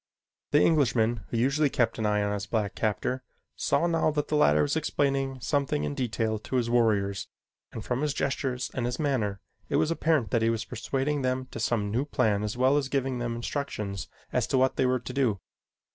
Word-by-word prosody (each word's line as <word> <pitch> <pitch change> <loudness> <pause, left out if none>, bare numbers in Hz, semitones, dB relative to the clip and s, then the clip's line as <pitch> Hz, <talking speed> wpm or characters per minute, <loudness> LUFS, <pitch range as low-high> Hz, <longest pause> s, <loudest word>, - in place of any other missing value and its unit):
The 150 - +4
Englishman, 120 -7 +2
who 115 - -2
usually 140 +5 +2
kept 115 -3 0
an 110 - +1
eye 105 0 +2
upon 105 0 0
his 100 0 -4
black 105 -3 -1
captor, 110 +4 -1 0.3
saw - - +1
now 165 -2 +2
that 150 -1 -2
the 150 - +1
latter 75 - +4
was 75 - 0
explaining 135 -2 0
something 140 - 0
in 75 -1 -2
detail 110 - -1
to 130 - -5
his 120 -2 +1
warriors, 105 -5 +2 0.4
and 110 - -7
from 125 +2 -1
his 150 -1 +1
gestures 130 -2 -1
and 120 -2 -1
his 125 0 -3
manner 115 -10 -1 0.3
it - - 0
was 160 - +2
apparent 155 -7 +1
that 115 - +2
he 115 - +3
was 115 0 -1
persuading 135 +5 -2
them 130 0 -1
to - - -6
some 110 -2 0
new 125 +6 0
plan 110 -8 +1
as 105 +2 -3
well 130 +3 +4
as 135 -2 -1
giving 135 -2 -1
them 120 -1 -2
instructions 110 - -4 0.3
as 125 -2 +1
to 130 - +1
what 130 0 +3
they 130 - +2
were 130 0 +2
to 125 - -7
do. 125 -7 +1
125 Hz, 210 wpm, -28 LUFS, 110-135 Hz, 0.4 s, The